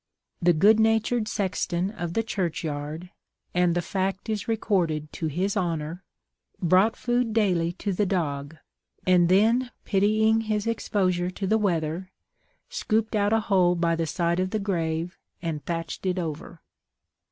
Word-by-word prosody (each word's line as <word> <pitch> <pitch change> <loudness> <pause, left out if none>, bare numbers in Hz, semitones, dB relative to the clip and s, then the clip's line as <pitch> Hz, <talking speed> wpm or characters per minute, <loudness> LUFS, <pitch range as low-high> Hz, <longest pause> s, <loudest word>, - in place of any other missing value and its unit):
The 175 0 +5
good 210 +7 +5
natured 225 +1 +2
sexton 190 -3 -1
of 175 -5 -5
the 225 - +2
churchyard, 165 -4 -3 0.4
(and 180 -1 +2
the 175 - 0
fact 195 +4 -2
is 215 -3 -2
recorded 175 -9 0
to 160 - -3
his 185 +7 -1
honour,) 165 0 -2 0.6
brought 185 +5 +3
food 240 -2 0
daily 180 -6 +2
to 200 +2 -3
the 200 +2 +1
dog, 150 -5 -2 0.5
and 180 -2 +4
then 225 +7 +3 0.2
pitying 215 +2 +3
his 215 -2 -1
exposure 185 -6 0
to 195 +2 -5
the 220 +3 +2
weather, 175 -2 -1 0.6
scooped 225 - -1
out 205 0 +2
a 225 0 +3
hole 185 -4 +3
by 170 -1 +1
the 165 -1 -1
side 170 +1 0
of 185 0 0
the 215 - -1
grave, 170 -4 -2 0.2
and 160 -4 -4
thatched 165 +2 -3
it 185 0 0
over. 165 -1 -5
185 Hz, 150 wpm, -26 LUFS, 170-215 Hz, 0.6 s, The